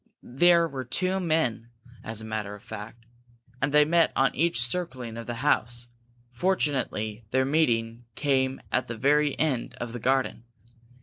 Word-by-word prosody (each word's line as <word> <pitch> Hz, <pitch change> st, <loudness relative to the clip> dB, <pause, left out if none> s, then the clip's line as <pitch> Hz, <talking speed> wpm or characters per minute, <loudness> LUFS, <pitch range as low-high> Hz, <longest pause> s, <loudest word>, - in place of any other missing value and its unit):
There 170 Hz, +6 st, +4 dB
were 135 Hz, -4 st, -5 dB
two 185 Hz, +9 st, 0 dB
men, 155 Hz, -10 st, 0 dB, 0.3 s
as 110 Hz, 0 st, -4 dB
a -, -, -7 dB
matter 110 Hz, -2 st, -4 dB
of 105 Hz, -, -15 dB
fact, 110 Hz, +2 st, -9 dB, 0.6 s
and 135 Hz, +2 st, +1 dB
they 150 Hz, 0 st, +6 dB
met 165 Hz, +1 st, +3 dB
on 135 Hz, -, +3 dB
each 170 Hz, -3 st, +1 dB
circling 125 Hz, -5 st, -3 dB
of 115 Hz, 0 st, -7 dB
the 120 Hz, -, -3 dB
house. 120 Hz, -4 st, +1 dB, 0.4 s
Fortunately, 125 Hz, -, -1 dB
their 130 Hz, +2 st, +2 dB
meeting 120 Hz, -6 st, +1 dB
came 135 Hz, -2 st, +1 dB
at 130 Hz, -, 0 dB
the 115 Hz, -, -5 dB
very 145 Hz, +3 st, +2 dB
end 145 Hz, -6 st, -1 dB
of 120 Hz, -1 st, -6 dB
the 120 Hz, -, -5 dB
garden. 130 Hz, -1 st, 0 dB
130 Hz, 160 wpm, -27 LUFS, 115-150 Hz, 0.6 s, they